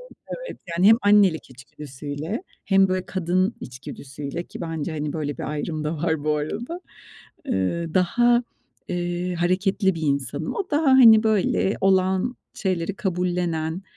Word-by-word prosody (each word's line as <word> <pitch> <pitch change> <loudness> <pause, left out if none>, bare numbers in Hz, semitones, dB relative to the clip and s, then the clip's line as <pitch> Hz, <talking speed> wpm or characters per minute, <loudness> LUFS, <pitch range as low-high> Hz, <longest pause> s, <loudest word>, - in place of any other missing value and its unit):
evet, - - -9
evet - - -8 0.2
yani 185 +4 +5
hem 225 - +8
annelik 200 -7 +4
içgüdüsüyle 145 - -7 0.2
hem 195 -1 +4
böyle 185 0 -1
kadın 185 +3 0
içgüdüsüyle 140 +5 -7
ki - - -10
bence, 165 -1 -3
hani, 150 -1 -3
böyle 145 -3 -4
bir - - -4
ayrım 155 +1 -3
da 155 +2 -2
var 160 -1 -1
bu 150 0 +1
arada. 240 - -4 0.7
Eee, 160 - -1
daha, 240 +7 +3 0.4
eee, 175 0 -2
hareketli 190 +2 +1
bir 165 - -6
insanım. 140 +1 -1
O 390 -3 -4
daha 300 0 +1
hani 225 -4 +8
böyle 210 -2 +1
olan 190 +4 +2 0.2
şeyleri 185 -1 -2
kabullenen, 180 -4 -2
175 Hz, 140 wpm, -23 LUFS, 155-195 Hz, 0.7 s, hem